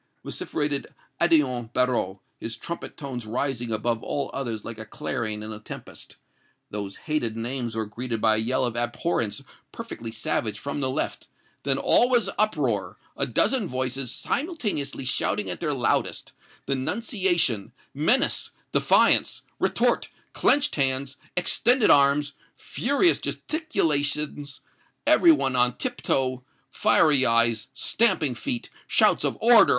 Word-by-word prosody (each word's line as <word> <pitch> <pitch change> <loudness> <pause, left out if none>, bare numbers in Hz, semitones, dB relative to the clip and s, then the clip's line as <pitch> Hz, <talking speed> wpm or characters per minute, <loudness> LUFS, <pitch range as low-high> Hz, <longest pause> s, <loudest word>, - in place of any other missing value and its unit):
vociferated 145 -2 -2 0.3
Odillon 130 -9 +2
Barrot, 120 -7 0 0.2
his 115 0 -5
trumpet 170 +8 -7
tones 130 -7 -6
rising 120 0 -2
above 115 +1 -1
all 140 -2 -2
others 115 -6 -4
like 115 -1 -7
a 110 - -7
clarion 110 -5 -4
in 110 0 -7
a 105 - -9
tempest. 105 - -11 0.5
Those 100 -2 -5
hated 120 -8 -3
names 120 0 -4
were 110 -1 -2
greeted 115 +2 -4
by 110 0 +3
a - - +1
yell 125 +3 0
of 120 -1 -3
abhorrence 120 -1 -1 0.3
perfectly 115 - -7
savage 110 -1 -2
from 140 +5 -5
the 130 - +1
left; 130 - -3 0.3
then 135 -1 -1
all 245 - +5
was 240 -4 +2
uproar 120 - 0 0.2
a 140 - -2
dozen 215 - +2
voices 130 0 -2
simultaneously 225 - -3
shouting 125 - 0
at - - -6
their - - -1
loudest - - -1 0.3
denunciation 175 - 0 0.2
menace 225 - +2 0.2
defiance - - +3 0.2
retort - - +1 0.2
clenched 290 +1 +3
hands 135 0 +3 0.2
extended 240 +6 +4
arms 140 +1 +5 0.2
furious 285 - +2
gesticulations 150 - -2 0.4
every 340 - +6
one 135 - +1
on 125 0 +2
tip 250 -1 -4
toe 130 -1 0 0.3
fiery 145 -4 +4
eyes 115 -2 +2
stamping 185 - +1
feet 245 - -4 0.2
shouts - - +3
of - - -1
'Order! 235 0 +6
135 Hz, 130 wpm, -25 LUFS, 115-165 Hz, 0.5 s, every